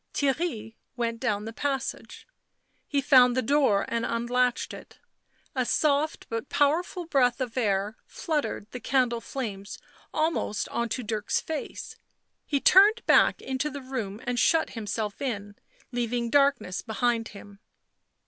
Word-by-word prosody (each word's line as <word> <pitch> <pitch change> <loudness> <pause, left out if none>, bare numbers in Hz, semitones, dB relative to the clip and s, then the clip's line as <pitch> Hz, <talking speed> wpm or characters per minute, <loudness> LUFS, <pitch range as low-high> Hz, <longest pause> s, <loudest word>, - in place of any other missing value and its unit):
Theirry 270 -6 -1 0.2
went 230 -1 -2
down 210 -1 -1
the 225 - -6
passage. 270 +1 -4 0.6
He 285 -1 0
found 255 -2 +6
the 255 - +2
door 265 -6 +3
and 230 0 -1
unlatched 245 +1 0
it; - - -12 0.6
a 255 - +1
soft 300 +4 +1
but 230 +3 -4
powerful 340 +5 +1
breath 255 -6 +2
of 250 -3 -3
air 205 -3 0
fluttered 300 - -2
the 250 - -6
candle 245 -2 +1
flames 205 -8 -5 0.3
almost 310 -9 -1
on 235 0 -2
to 250 +3 -3
Dirk's 215 -1 -1
face; 315 -2 -6 0.5
he 285 - +1
turned 415 +9 +6
back - - +4
into 265 +3 -2
the 285 0 -6
room 225 -6 -4
and 245 0 -1
shut 320 +5 +3
himself 215 -2 -4
in, 205 -6 -4 0.4
leaving 240 -1 -1
darkness 280 -9 +2
behind 230 0 0
him. 200 0 -13
245 Hz, 140 wpm, -27 LUFS, 225-280 Hz, 0.6 s, found